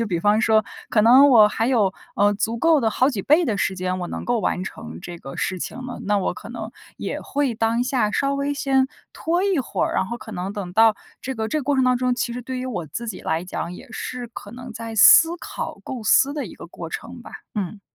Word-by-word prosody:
就 -, -, +1 dB
比 175 Hz, -4 st, -1 dB
方 210 Hz, +4 st, +3 dB
说 220 Hz, -1 st, +3 dB, 0.2 s
可 220 Hz, -, +3 dB
能 260 Hz, +6 st, +7 dB
我 215 Hz, -4 st, +7 dB
还 225 Hz, +2 st, -1 dB
有， 215 Hz, -7 st, +2 dB, 0.2 s
呃， 205 Hz, 0 st, +3 dB
足 225 Hz, +3 st, -2 dB
够 325 Hz, +2 st, +4 dB
的 225 Hz, -3 st, +1 dB
好 255 Hz, +4 st, +2 dB
几 220 Hz, -9 st, -3 dB
倍 310 Hz, -, +4 dB
的 220 Hz, -9 st, 0 dB
时 190 Hz, -1 st, -1 dB
间 185 Hz, 0 st, -2 dB
我 175 Hz, -, -4 dB
能 -, -, -5 dB
够 240 Hz, -2 st, 0 dB
完 185 Hz, -2 st, -1 dB
成 80 Hz, -, -8 dB
这 175 Hz, -, -8 dB
个 135 Hz, -4 st, -9 dB
事 185 Hz, -, -2 dB
情 -, -, -5 dB
了， 250 Hz, -1 st, -7 dB
那 205 Hz, 0 st, +2 dB
我 190 Hz, -, -1 dB
可 -, -, -10 dB
能 -, -, -6 dB, 0.3 s
也 -, -, -4 dB
会 280 Hz, -4 st, -1 dB
当 225 Hz, +2 st, +1 dB
下 250 Hz, -5 st, +1 dB
稍 275 Hz, +6 st, 0 dB
微 280 Hz, +1 st, -1 dB
先 270 Hz, -2 st, +1 dB, 0.2 s
拖 345 Hz, +3 st, 0 dB
一 390 Hz, -4 st, +1 dB
会 255 Hz, -, -1 dB
儿， -, -, -4 dB
然 -, -, +2 dB
后 235 Hz, +3 st, -5 dB
可 220 Hz, -, -10 dB
能 185 Hz, +1 st, -4 dB
等 195 Hz, -4 st, -6 dB
到 220 Hz, +1 st, +5 dB, 0.3 s
这 265 Hz, -, -3 dB
个 220 Hz, -1 st, -2 dB
这 310 Hz, -, 0 dB
个 -, -, -6 dB
过 285 Hz, +1 st, 0 dB
程 260 Hz, -, +3 dB
当 255 Hz, 0 st, +3 dB
中， 250 Hz, 0 st, +1 dB
其 240 Hz, -1 st, -2 dB
实 245 Hz, +1 st, -5 dB
对 260 Hz, +1 st, -5 dB
于 255 Hz, -, -4 dB
我 195 Hz, -10 st, -4 dB
自 235 Hz, +11 st, -6 dB
己 210 Hz, -, -5 dB
来 165 Hz, +2 st, -2 dB
讲， 180 Hz, -1 st, -5 dB
也 180 Hz, -, -11 dB
是 250 Hz, +2 st, -5 dB
可 205 Hz, -3 st, -10 dB
能 245 Hz, +1 st, -9 dB
在 225 Hz, 0 st, -7 dB
思 330 Hz, +10 st, +8 dB
考、 -, -, -6 dB
构 255 Hz, -3 st, -6 dB
思 265 Hz, +6 st, +4 dB
的 295 Hz, -, -3 dB
一 -, -, -10 dB
个 -, -, -10 dB
过 -, -, -8 dB
程 -, -, -7 dB
吧， -, -, -12 dB, 0.2 s
嗯。 205 Hz, 0 st, -4 dB
230 Hz, 280 characters per minute, -22 LUFS, 205-260 Hz, 0.3 s, 思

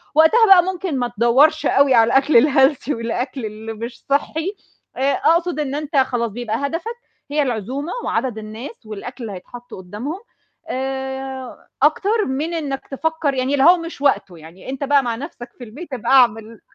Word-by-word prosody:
وقتها 320 Hz, +10 st, +6 dB
بقى 380 Hz, -3 st, +8 dB
ممكن 365 Hz, -5 st, -3 dB
ما 245 Hz, -, 0 dB
تدوّرش 265 Hz, +8 st, +4 dB
أوي 275 Hz, -1 st, +4 dB
على 230 Hz, -2 st, +5 dB
الأكل 270 Hz, -1 st, +5 dB
الhealthy 270 Hz, +1 st, +3 dB
والأكل 240 Hz, +2 st, -3 dB
اللي 215 Hz, +1 st, -7 dB
مش 235 Hz, +2 st, -8 dB
صحّي، 315 Hz, +7 st, -1 dB, 0.4 s
آآ 275 Hz, +2 st, +2 dB
أقصد 335 Hz, 0 st, +1 dB
إن 285 Hz, -2 st, -2 dB
أنت 300 Hz, 0 st, -3 dB
خلاص، 245 Hz, -4 st, +1 dB
بيبقى 225 Hz, 0 st, -3 dB
هدفك 335 Hz, +11 st, -4 dB, 0.4 s
هي 300 Hz, +1 st, +2 dB
العزومة 260 Hz, -, -3 dB
وعدد 250 Hz, -4 st, -1 dB
الناس 220 Hz, -, -9 dB
والأكل 220 Hz, +4 st, -8 dB
اللي 215 Hz, -3 st, -5 dB
هيتحط 245 Hz, +6 st, -12 dB
قُدّامهم، 210 Hz, -, -6 dB, 0.5 s
آآ 265 Hz, 0 st, -5 dB
أكتر 405 Hz, +9 st, +2 dB
من 290 Hz, +6 st, -2 dB
إنّك 285 Hz, -5 st, -4 dB
تفكّر 320 Hz, 0 st, -1 dB
يعني 260 Hz, +1 st, -1 dB
اللي 275 Hz, -2 st, +3 dB
هو 355 Hz, +2 st, +7 dB
مش 335 Hz, -4 st, -8 dB
وقته 240 Hz, -10 st, +1 dB
يعني، 165 Hz, +7 st, -12 dB
أنت 270 Hz, +1 st, -4 dB
بقى 280 Hz, 0 st, +3 dB
مع 235 Hz, -2 st, -2 dB
نفْسك 245 Hz, -1 st, -8 dB
في 250 Hz, -, -10 dB
البيت 270 Hz, +7 st, -10 dB
ابقى 250 Hz, -1 st, -2 dB
اعمل 230 Hz, -4 st, +3 dB
265 Hz, 170 wpm, -20 LUFS, 235-305 Hz, 0.5 s, بقى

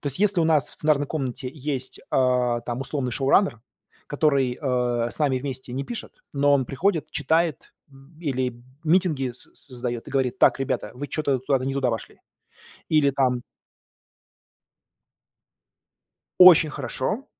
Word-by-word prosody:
То -, -, -8 dB
есть 140 Hz, -, -2 dB
если 205 Hz, -4 st, +3 dB
у -, -, +3 dB
нас 155 Hz, -5 st, +2 dB
в -, -, -12 dB
сценарной 150 Hz, -2 st, +1 dB
комнате 130 Hz, -4 st, -4 dB
есть, 135 Hz, -3 st, -4 dB
э, 125 Hz, -2 st, +1 dB
там, 120 Hz, +2 st, -3 dB
условный 135 Hz, -2 st, -3 dB
шоураннер, 135 Hz, -, +2 dB, 0.5 s
который, 140 Hz, -4 st, +1 dB
э, 125 Hz, -3 st, 0 dB
с -, -, -4 dB
нами 140 Hz, -4 st, +1 dB
вместе 130 Hz, -2 st, -6 dB
не 135 Hz, +2 st, -3 dB
пишет, 235 Hz, -, -5 dB, 0.2 s
но 145 Hz, 0 st, +2 dB
он 135 Hz, -2 st, +1 dB
приходит, 160 Hz, +1 st, -1 dB
читает, 160 Hz, +1 st, 0 dB, 0.2 s
м, 135 Hz, +4 st, -19 dB
или 130 Hz, -5 st, -1 dB, 0.3 s
митинги 155 Hz, -6 st, +2 dB
соз 120 Hz, -, -4 dB, 0.2 s
создаёт 120 Hz, -1 st, -4 dB
и -, -, -9 dB
говорит: 130 Hz, -3 st, -1 dB
"Так, -, -, +4 dB
ребята, 135 Hz, -, -2 dB
вы 145 Hz, +3 st, -6 dB
чё-то 140 Hz, -3 st, 0 dB
куда-то 130 Hz, 0 st, 0 dB
не 135 Hz, -, -1 dB
туда 135 Hz, -2 st, 0 dB
вошли". 115 Hz, -2 st, -6 dB, 0.8 s
Или 145 Hz, -2 st, +4 dB
там 125 Hz, -2 st, 0 dB, 3.0 s
Очень 175 Hz, -4 st, +9 dB
хорошо, 150 Hz, -, -3 dB
135 Hz, 150 wpm, -24 LUFS, 125-150 Hz, 3.0 s, Очень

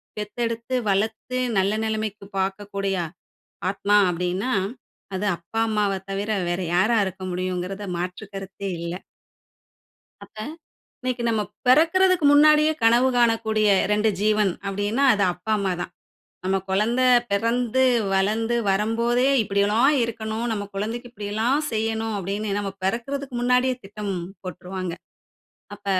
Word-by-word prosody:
பெத்தெடுத்து 230 Hz, +3 st, -3 dB
வளத்து 220 Hz, +5 st, -1 dB, 0.2 s
நல்ல 195 Hz, +2 st, +2 dB
நெலைமைக்கு 215 Hz, -2 st, -3 dB
பார்க்கக்கூடிய 195 Hz, 0 st, -2 dB, 0.8 s
ஆத்மா 205 Hz, +1 st, +1 dB
அப்பிடின்னா, 180 Hz, +8 st, -1 dB, 0.6 s
அது 190 Hz, -, -2 dB
அப்பா, 200 Hz, +7 st, -5 dB
அம்மாவ 210 Hz, -2 st, +1 dB, 0.2 s
தவிர 200 Hz, +2 st, -3 dB, 0.2 s
வேற 175 Hz, +2 st, -1 dB
யாரா 215 Hz, +6 st, +3 dB
இருக்க 190 Hz, 0 st, -6 dB
முடியும்ங்கிறதுல 185 Hz, +2 st, -3 dB
மாற்று 180 Hz, +4 st, -4 dB
கருத்தே 195 Hz, 0 st, -6 dB
இல்ல. 170 Hz, 0 st, -4 dB, 1.3 s
அப்ப -, -, -22 dB, 0.6 s
இன்னைக்கு 255 Hz, -1 st, -2 dB
நம்ம 220 Hz, -2 st, +1 dB, 0.2 s
பிறக்கிறதுக்கு 335 Hz, +5 st, +4 dB
முன்னாடியே 305 Hz, +1 st, +6 dB
கனவு 240 Hz, +3 st, +5 dB
காணக்கூடிய 220 Hz, -2 st, +2 dB, 0.2 s
2 210 Hz, +1 st, +3 dB
ஜீவன் 210 Hz, -1 st, +3 dB, 0.2 s
அப்பிடின்னா 205 Hz, +7 st, 0 dB
அது 205 Hz, -, +1 dB
அப்பா, 180 Hz, +5 st, -8 dB
அம்மா 195 Hz, -2 st, 0 dB
தான். -, -, -5 dB, 0.5 s
நம்ம 190 Hz, +1 st, +1 dB
கொழந்த 225 Hz, +6 st, +2 dB, 0.3 s
பிறந்து, 235 Hz, +4 st, +1 dB, 0.3 s
வளர்ந்து 220 Hz, +5 st, +1 dB
வரும்போதே, 230 Hz, +5 st, +1 dB, 0.2 s
"இப்பிடி 200 Hz, -1 st, 0 dB
எல்லாம் 235 Hz, +8 st, +4 dB
இருக்கணும். 220 Hz, 0 st, -4 dB
நம்ம 205 Hz, -2 st, -2 dB
குழந்தைக்கு 230 Hz, +5 st, -4 dB
இப்பிடிலாம் 220 Hz, +6 st, 0 dB
செய்யணும்" 225 Hz, 0 st, -1 dB
அப்பிடின்னு 200 Hz, +2 st, -3 dB
நம்ம 200 Hz, -1 st, -2 dB
பிறக்கிறதுக்கு 260 Hz, +5 st, -2 dB
முன்னாடியே 250 Hz, +1 st, +3 dB
திட்டம் 205 Hz, 0 st, -5 dB, 0.3 s
போட்டுருவாங்க. 185 Hz, -1 st, -5 dB, 0.8 s
அப்ப 205 Hz, 0 st, -19 dB
215 Hz, 120 wpm, -24 LUFS, 195-235 Hz, 1.3 s, முன்னாடியே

